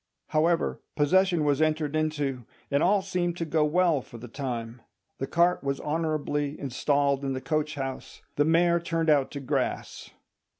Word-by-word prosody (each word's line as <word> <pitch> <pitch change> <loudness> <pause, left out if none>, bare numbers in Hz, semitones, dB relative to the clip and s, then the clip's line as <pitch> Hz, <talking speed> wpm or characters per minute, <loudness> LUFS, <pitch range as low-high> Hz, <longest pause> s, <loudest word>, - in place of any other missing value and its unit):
However, 165 +2 +1
possession 175 +2 +3
was 145 +1 +2
entered 155 -1 +1
into, 145 -6 -1 0.2
and 140 +1 +2
all 195 +2 +3
seemed 180 -2 -1
to 165 - -2
go 160 -1 +1
well 165 -1 +2
for 120 - -12
the 120 +2 -9
time. 120 -2 -5 0.4
The 135 - -2
cart 175 +2 +2
was 140 0 -1
honourably 150 -2 -2
installed 140 +1 0
in 135 -1 -1
the 130 - -3
coach 155 +1 -1
house, 135 -2 -6
the 145 - +3
mare 170 +2 +3
turned 165 -1 0
out 140 -3 +3
to 145 - -6
grass. 135 - -3
150 Hz, 165 wpm, -27 LUFS, 140-165 Hz, 0.4 s, possession